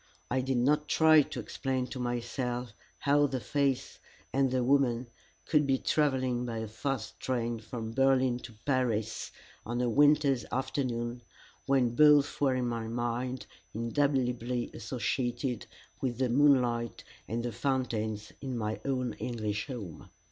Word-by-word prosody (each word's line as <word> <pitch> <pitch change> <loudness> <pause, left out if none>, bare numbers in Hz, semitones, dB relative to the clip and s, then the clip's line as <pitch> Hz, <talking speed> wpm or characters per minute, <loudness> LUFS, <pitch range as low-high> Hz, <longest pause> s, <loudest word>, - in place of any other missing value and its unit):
I 130 +1 +2
did 130 0 0
not 150 +5 +2
try 160 -1 +6
to - - -5
explain 130 -1 -2
to 130 - -6
myself 120 0 -3 0.2
how 145 +1 +3
the 130 -1 -2
face, 140 0 -1 0.3
and 135 0 +3
the 130 0 +1
woman, 130 -2 +2 0.4
could 150 -2 +3
be 135 -1 +3
travelling 130 -5 +1
by 115 -2 -4
a 110 0 -3
fast 115 +1 -4
train 120 -2 -1
from 110 0 -6
Berlin 130 -1 +3
to 120 -1 -10
Paris 120 -6 0 0.3
on 120 +2 -3
a 125 - +1
winter's 145 +1 +4
afternoon, 125 -2 -2 0.5
when 130 -4 +3
both 145 +1 +5
were 135 -2 +3
in 125 -1 0
my 115 -1 -3
mind 120 +2 -2 0.3
indelibly 125 0 0
associated 120 +1 -2 0.3
with 125 -3 -1
the 130 -1 +1
moonlight 125 -3 +3 0.2
and 115 +1 -2
the 120 - -2
fountains 110 -5 -2
in 130 -3 -3
my 110 -1 -2
own 125 -4 -1
English 110 -3 -3
home. 105 - -7
125 Hz, 140 wpm, -30 LUFS, 120-135 Hz, 0.5 s, try